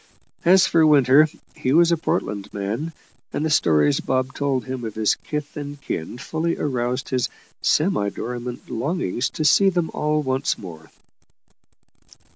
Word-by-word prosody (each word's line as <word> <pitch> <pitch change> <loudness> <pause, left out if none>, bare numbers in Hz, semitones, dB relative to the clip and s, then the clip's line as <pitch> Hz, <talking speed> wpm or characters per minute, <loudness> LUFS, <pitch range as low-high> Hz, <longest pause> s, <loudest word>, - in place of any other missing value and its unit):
As 185 +2 +6
for 165 - +3
Winter, 145 0 +6 0.3
he 130 - -1
was 170 +2 +5
a - - +5
Portland 105 -10 -2
man, 110 +11 -3 0.4
and 155 - -2
the 160 - 0
stories 75 - +3
Bob 130 0 -1
told 140 -3 -1
him 130 -2 -5
of 110 -2 -5
his 110 -1 +2
kith 150 -1 -6
and 145 -1 -6
kin 85 -2 -5
fully 160 +6 -2
aroused 125 -1 -2
his 125 -1 0 0.3
semi 150 - +2
dormant 120 +3 -6
longings 130 - -2
to 155 - -3
see 195 +5 +5
them 175 -3 -1
all 150 0 0
once 130 0 0
more. 80 -4 -10
135 Hz, 150 wpm, -22 LUFS, 120-155 Hz, 0.4 s, As